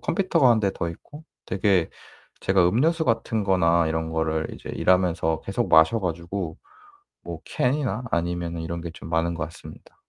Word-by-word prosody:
컴퓨터가 170 -9 +2
1 115 -2 +4
대 100 -2 +1
더 85 - -3
있고 150 - -12 0.2
되게 95 -2 +2 0.5
제가 95 -2 +3
음료수 160 - +2
같은 115 -3 0
거나 85 -3 +3
이런 80 0 -2
거를 80 -1 -1
이제 - - -8
일하면서 85 -4 +1
계속 - - -2
마셔 80 +8 +5
가지고 85 0 -4 0.7
뭐 - - -6
캔이나 125 - -1
아니면은 85 0 -2
이런 85 +1 -4
게 85 0 -6
좀 80 -2 -11
많은 85 +1 +1
것 80 -1 -3
같습니다. 80 +1 -13
85 Hz, 325 characters per minute, -24 LUFS, 80-110 Hz, 0.7 s, 마셔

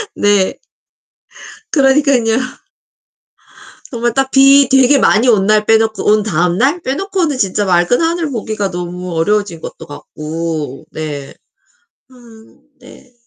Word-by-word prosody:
네. 205 -2 +1 1.1
그러니깐요. 270 -5 +2 1.5
정말 240 -2 -2
딱 270 +2 -1
비 275 0 +5
되게 265 +1 +4
많이 230 +1 +3
온 205 -5 +3
날 215 +1 +2
빼놓고 220 0 +1
온 215 0 +3
다음날 200 - 0
빼놓고는 330 +1 -2
진짜 205 -2 -1
맑은 180 - +2
하늘 330 -1 -1
보기가 215 -4 -3
너무 180 0 -6
어려워진 190 0 -1
것도 - - -9
같고. 155 -1 -6
네. 145 -3 -6 0.8
아 260 - -21 0.7
네 250 0 -17
215 Hz, 220 characters per minute, -14 LUFS, 180-270 Hz, 1.5 s, 비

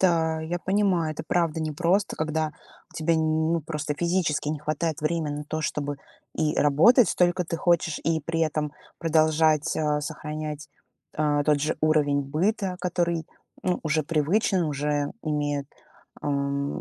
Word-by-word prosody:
Да, 160 -3 +2
я 170 +2 -3
понимаю, 185 -5 +1
это - - -7
правда 165 -2 +1
непросто, 170 +6 +1
когда 155 0 -1 0.4
тебе 160 +1 +1
нь 160 - +1 0.3
ну 170 - +1
просто 150 -1 -3
физически 170 -2 0
не 155 -1 -2
хватает 155 +1 -2
время 155 0 -1
на 150 0 -5
то, 155 +2 -3
чтобы 145 0 -2 0.4
и 155 -1 0
работать 185 - +5
столько 180 0 +2
ты 165 0 -3
хочешь, 170 -2 +1
и 160 -1 +1
при 165 +2 -2
этом 155 -2 0 0.3
продолжать, 155 -2 +2
а, 150 -1 +1
сохранять, 150 0 -5 0.5
а, 145 -1 +2
тот 150 -1 +3
же 155 +2 0
уровень 150 -2 +3
быта, 185 +7 -1
который 170 -2 -1 0.4
ну 180 -1 0
уже 155 0 +1
привычен, 175 +5 +1
уже 145 0 -1
имеет, 145 -2 -1 0.5
ам, 140 -1 -1
155 Hz, 145 wpm, -26 LUFS, 150-170 Hz, 0.5 s, работать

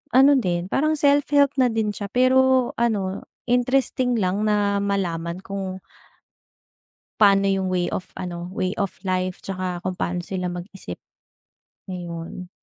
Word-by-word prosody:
ano 275 +2 +7
din 180 -4 -2
parang 310 +3 +2
self-help 285 -1 +4
na 255 - +5
din 220 -2 0
siya, 200 -1 -5
pero 255 +1 +4
ano 200 -5 0 0.2
interesting 250 0 +2
lang 200 +2 0
na 205 -1 +2
malaman 175 -3 -2
kung 195 -1 -4 1.4
Paano 200 -1 +6
yung 195 -1 +1
way 180 -1 0
of 180 - -4
ano, 175 -1 -5
way 185 -1 -2
of 195 -2 -2
life 185 0 -1
tsaka 185 -2 -4
kung 185 - 0
pano 180 0 -2
sila 180 -1 -3
mag 175 0 -5
isip. 90 - -7 0.9
Ayun. 175 0 -6
195 Hz, 140 wpm, -23 LUFS, 180-245 Hz, 1.4 s, ano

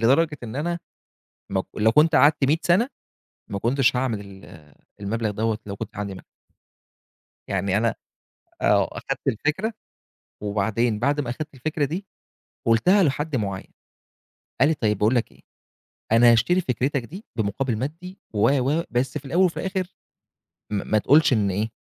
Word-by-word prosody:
لدرجة 150 +6 +3
إن 115 +2 -6
أنا 170 +3 -1 0.7
مك 95 -1 0
لو 110 +1 +3
كنت 155 +4 +4
قعدت 145 -1 +5
100 150 +4 +3
سنة، 200 +10 +3 0.6
ما 100 - -2
كنتش 125 +2 +2
هاعمل 125 -4 0 0.3
ال 75 -3 -15 0.3
المبلغ 110 +1 -1
دوّة، 110 +1 -1
لو 100 - -5
كنت - - -7
عندي 100 -1 -3
ما - - -11 1.3
يعني 95 0 0
أنا 115 +1 +1 0.7
آه، - - +3
أخدت - - -5
الفكرة، 155 - 0 0.7
وبعدين 105 +2 0
بعد 145 +5 +1
ما 120 - -3
أخدت 150 +3 -6
الفكرة 150 +3 -1
دي، 175 +8 -4 0.6
قُلتها 180 - +4
لحد 150 -1 0
معيّن، 100 -4 -4 0.9
قال 140 - +5
لي: 160 - +1
"طيّب 105 -6 0
باقول 110 +5 +2
لك 120 - 0
إيه، - - -22 0.7
أنا 120 +1 +7
هاشتري 175 +11 +3
فكرتك 130 -2 -1
دي 190 - -10
بمقابل 110 +2 -1
مادي 165 - -6 0.2
و 105 +4 +4 0.2
و 165 +2 +1
بس 125 +2 -1
في 140 - -15
الأوّل 175 +7 +2
وفي 175 - 0
الآخر، 190 -1 -3 0.8
م - - -3 0.2
ما 110 - +4
تقولش 145 +5 +4
إن 105 -4 +2
إيه، 105 +4 -1
125 Hz, 155 wpm, -24 LUFS, 110-155 Hz, 1.3 s, أنا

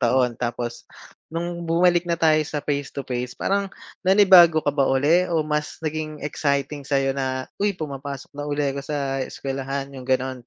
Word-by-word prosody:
taon? 125 0 +2
Tapos 120 0 -4 0.5
no'ng 170 0 -3
bumalik 175 +1 +3
na 170 - +1
tayo 160 -2 +4
sa 150 -1 -4
face-to-face, 135 -3 -3
parang 200 0 0 0.4
nanibago 185 -5 +7
ka - - +3
ba 140 -2 +2
uli 150 +7 +3
o 165 -2 +1
mas 150 +1 -3
naging 155 -1 -4
exciting 140 -1 -1
sa'yo 135 -1 +1
na, 130 -1 -2 0.2
"Uy, 205 0 +1
pumapasok 140 -4 -6
na 145 - -3
uli 145 0 -1
ako 140 +1 -4
sa 140 -2 -2
eskwelahan." 135 +1 -4
'Yong 130 -2 -9
gano'n, 130 -1 -1
145 Hz, 160 wpm, -23 LUFS, 135-160 Hz, 0.5 s, nanibago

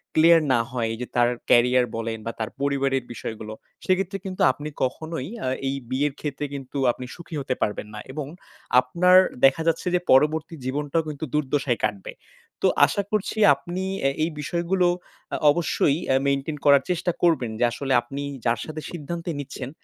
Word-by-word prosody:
Clear 165 +1 +6
না 120 - +3
হয় 120 -3 -1
এই - - -6
যে 125 - -4
তার 120 0 +4 0.2
career 125 +1 +5
বলেন 115 0 -3
বা 115 - -2
তার 110 - -2
পরিবারের 135 -2 +1
বিষয়গুলো, 110 -2 -6 0.3
সেক্ষেত্রে 190 +1 +1
কিন্তু 185 -1 -4
আপনি 145 +4 -7
কখনোই 160 +1 -3 0.2
আ - - -1 0.2
এই 135 - -1
বিয়ের 135 +2 0
ক্ষেত্রে 145 -1 -3
কিন্তু 135 0 -6
আপনি 125 +1 -8
সুখী 170 -2 -9
হতে 135 -2 -1
পারবেন 105 0 -1
না। 105 - -6
এবং, 150 0 -4 0.5
আপনার 175 +9 +4 0.3
দেখা 135 +4 +4
যাচ্ছে 165 +2 0
যে - - +3
পরবর্তী 155 +4 +3
জীবনটাও 145 +4 -1
কিন্তু 150 +1 -5
দুর্দশায় 140 -4 0
কাটবে। 105 -2 -2 0.5
তো - - +4 0.2
আশা 200 - -1
করছি, 215 +1 -1 0.2
আপনি 175 +6 -5 0.2
এ - - +4
এই 165 - +1
বিষয়গুলো, 175 +3 +1 0.5
আ - - 0
অবশ্যই 150 -2 +1 0.2
এ - - +4
মেইনটেন 140 +2 -1
করার 140 -2 +6
চেষ্টা 175 0 0
করবেন 155 -9 +2
যে - - +2
আসলে 135 +1 -2
আপনি 135 +4 -7 0.2
যার 115 0 +2
সাথে 155 0 -6
সিদ্ধান্তে 170 +1 -5
নিচ্ছেন, 135 -2 -6
140 Hz, 170 wpm, -24 LUFS, 130-165 Hz, 0.5 s, Clear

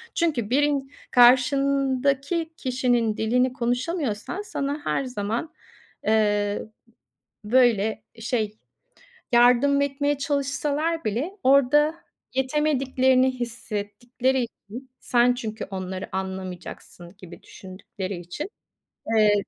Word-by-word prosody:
Çünkü 290 - 0
birin 280 0 +1 0.2
karşındaki 275 +5 +3
kişinin 245 -4 0
dilini 250 +3 +1
konuşamıyorsan 250 - -2
sana 285 -7 -3
her - - 0
zaman, 235 +4 -3 0.5
eee, 205 -1 +2 0.9
ı 210 - -8
böyle, 220 -4 +3 0.2
şey, 220 -2 -2 0.7
yardım 250 +4 +5
etmeye 285 +1 0
çalışsalar 290 +3 -1
bile 240 - -1
orada 280 +4 +4 0.4
yetemediklerini 260 -2 +2
hissettikleri 240 +2 -2
için 235 +2 -10
Sen 245 0 +3
çünkü 220 -3 -5
onları 185 0 -5
anlamayacaksın 185 -1 -7
gibi 180 -3 -13
düşündükleri 190 0 -8
için, 180 - -6 0.7
eee, 210 -1 +5
250 Hz, 90 wpm, -24 LUFS, 215-280 Hz, 0.9 s, yardım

